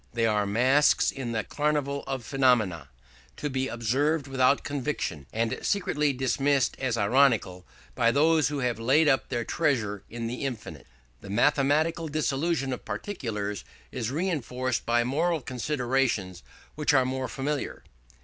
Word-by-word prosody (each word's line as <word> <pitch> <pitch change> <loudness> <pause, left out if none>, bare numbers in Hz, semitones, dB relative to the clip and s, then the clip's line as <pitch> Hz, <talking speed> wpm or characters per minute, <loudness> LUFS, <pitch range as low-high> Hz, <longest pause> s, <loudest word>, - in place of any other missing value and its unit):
They 115 -1 +1
are 105 -2 +1
masks 130 +8 +3
in 130 -3 -5
the 110 -2 -1
carnival 145 0 -1
of 135 -3 -4
phenomena, 110 - +1 0.5
to 145 - -3
be 130 0 -1
observed 135 +7 0
without 135 0 +2
conviction, 135 - -3
and 115 0 -1
secretly 150 -7 +1
dismissed 135 +1 +1
as 125 -3 -1
ironical 105 -5 +2 0.3
by 115 - +3
those 155 +4 +3
who 145 -2 -3
have 120 -3 -1
laid 135 +7 +3
up 135 -2 +2
their 120 -2 -2
treasure 115 - 0
in 115 0 -5
the 120 +3 -4
infinite. 125 -5 -6 0.3
This - - -10
mathematical 150 +8 +2
dissolution 145 -1 -1
of 125 - -7
particulars 105 - -4 0.3
is 120 -3 -3
reinforced 130 -6 -2
by 120 0 +3
moral 160 +7 0
considerations 125 - -1 0.3
which 150 -1 +1
are 130 -1 +4
more 130 0 -2
familiar. 145 0 -3
130 Hz, 140 wpm, -27 LUFS, 115-145 Hz, 0.5 s, are